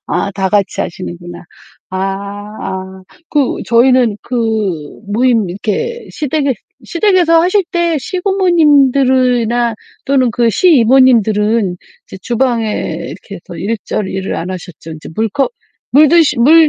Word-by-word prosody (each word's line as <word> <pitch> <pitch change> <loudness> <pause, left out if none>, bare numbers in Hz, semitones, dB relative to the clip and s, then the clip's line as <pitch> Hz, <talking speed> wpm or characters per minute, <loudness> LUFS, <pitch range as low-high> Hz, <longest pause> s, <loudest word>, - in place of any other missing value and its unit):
아 200 - -1
다 195 -1 -1
같이 200 -2 0
하시는구나. 175 0 -7 0.5
아아. 195 0 -5 0.3
그 290 -4 0
저희는 240 -2 +3
그 255 - -7 0.8
모임 230 -4 +2
이렇게 465 - -3
시댁에 290 -2 -1 0.3
시댁에서 345 -3 +3
하실 380 +3 +2
때 340 -3 0
시부모님들이나 270 - +2 0.3
또는 265 -3 +2
그 235 +1 +1
시이모님들은 230 - +3 0.3
이제 - - -10
주방에 240 -1 0 0.4
이렇게 - - -10
해서 - - -11
일절 210 -1 -3
일을 190 0 -4
안 175 - -4
하셨죠. 175 -3 -8
이제 155 - -11
물컵 225 - 0 0.4
물 300 +3 +6
드시 320 -5 +3
물 315 +6 +6
240 Hz, 265 characters per minute, -14 LUFS, 200-295 Hz, 0.8 s, 물